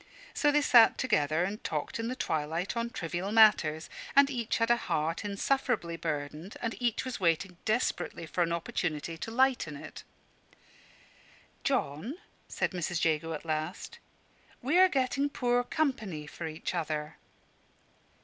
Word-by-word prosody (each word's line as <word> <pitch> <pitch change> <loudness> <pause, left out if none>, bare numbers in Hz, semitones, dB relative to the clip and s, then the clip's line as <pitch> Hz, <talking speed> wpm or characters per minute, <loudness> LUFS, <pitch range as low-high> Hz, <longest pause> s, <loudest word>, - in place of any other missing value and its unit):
So 295 - +3
they 295 0 +3
sat 235 -5 +7
together 155 - +1
and 200 +4 -4
talked 150 +7 -3
in 230 - -2
the 255 - -3
twilight 160 -1 -2
on 235 0 -1
trivial 175 -1 -4
matters; 175 -8 +5 0.3
and 280 0 +6
each 235 -4 -1
had 230 0 +2
a - - +6
heart 165 -6 -1
insufferably 205 -3 0
burdened, 155 +2 -4
and 230 -1 -2
each 240 0 0
was 255 -3 -4
waiting 175 +1 +1
desperately 215 -6 -1
for 175 - -2
an 170 -1 +2
opportunity 165 -1 -2
to - - -5
lighten 245 - +2
it. - - -10 1.6
"John," 155 - -1 0.3
said - - -1
Mrs. 175 -2 -1
Jago 160 0 0
at 155 - -6
last, 155 +4 -4 0.6
"we 295 +8 +2
are 375 0 +7
getting 275 -1 +1
poor 245 -2 +1
company 220 - -2
for 165 +2 -6
each 155 0 -4
other. 150 -1 -3
185 Hz, 145 wpm, -30 LUFS, 160-245 Hz, 1.6 s, sat